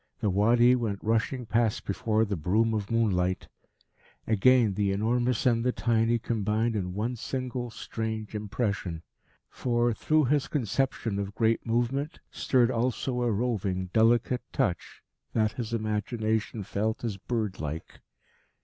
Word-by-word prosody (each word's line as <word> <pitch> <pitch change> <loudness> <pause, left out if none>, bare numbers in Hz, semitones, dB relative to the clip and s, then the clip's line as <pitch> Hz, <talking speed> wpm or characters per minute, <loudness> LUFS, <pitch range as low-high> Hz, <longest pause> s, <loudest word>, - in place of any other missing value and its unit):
The 105 - +1
Wadi 120 +5 +5
went 110 -5 -1
rushing 115 +3 0
past 115 -1 0
before 110 +2 +1
the 100 -1 -2
broom 105 +8 +1
of 105 -2 -2
moonlight. 95 -6 +1 0.8
Again, 115 0 +4
the 100 0 0
enormous 120 +4 0
and 115 -2 +3
the 125 - +2
tiny 115 -1 +2
combined 110 0 0
in 90 -3 -3
one 115 +5 -1
single 125 0 -4
strange 110 -1 -5
impression. 100 -5 -3 0.4
For, 120 -1 0
through 155 +3 +2
this 145 -2 +2
conception 120 -4 -1
of 100 0 -4
great 115 0 +1
movement, 120 +6 -1
stirred 125 -2 +2
also 125 +1 -1
a 120 -1 +1
roving, 100 -5 -1
delicate 120 +2 +3
touch 90 -3 -2 0.3
that 110 -1 +2
his 115 -1 -5
imagination 110 0 -1
felt 110 +4 -2
as 110 -5 -2
bird 105 -2 -3
like. 80 +1 -6
110 Hz, 135 wpm, -28 LUFS, 105-120 Hz, 0.8 s, Wadi